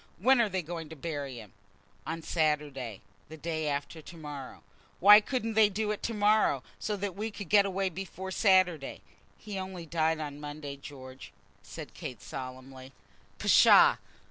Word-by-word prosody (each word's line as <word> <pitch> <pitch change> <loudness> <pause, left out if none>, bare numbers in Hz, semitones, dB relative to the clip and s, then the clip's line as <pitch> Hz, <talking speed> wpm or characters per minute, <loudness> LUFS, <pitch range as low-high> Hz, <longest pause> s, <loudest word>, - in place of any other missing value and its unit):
When 250 +6 +4
are 220 - +1
they 185 -2 -2
going 165 -1 -6
to 160 - -9
bury 145 -3 -5
him?" 105 -4 -12 0.5
"On 165 +1 -4
Saturday, 150 - -1 0.3
the 160 - -9
day 160 -1 -3
after 145 +3 -3
to 170 +2 -12
morrow." 145 -4 -8 0.4
"Why 205 +3 +9
couldn't 225 -1 -2
they 215 -1 +5
do 210 +1 -2
it 210 - -4
to 230 - -2
morrow, 210 -10 +3 0.2
so 210 -1 -2
that 200 -2 -4
we 215 +3 -3
could 205 -5 -8
get 200 -1 +5
away 195 0 -1
before 190 +1 -7
Sunday?" 185 -7 +2 0.4
"He 205 -3 -6
only 185 -2 -6
died 160 0 0
on 145 -2 -6
Monday, 145 -1 -7
George," 135 -2 -11 0.3
said - - -10
Kate, 125 - -7
solemnly. 130 +2 -9 0.4
"Psha! - - +6
165 Hz, 165 wpm, -30 LUFS, 145-200 Hz, 0.5 s, Why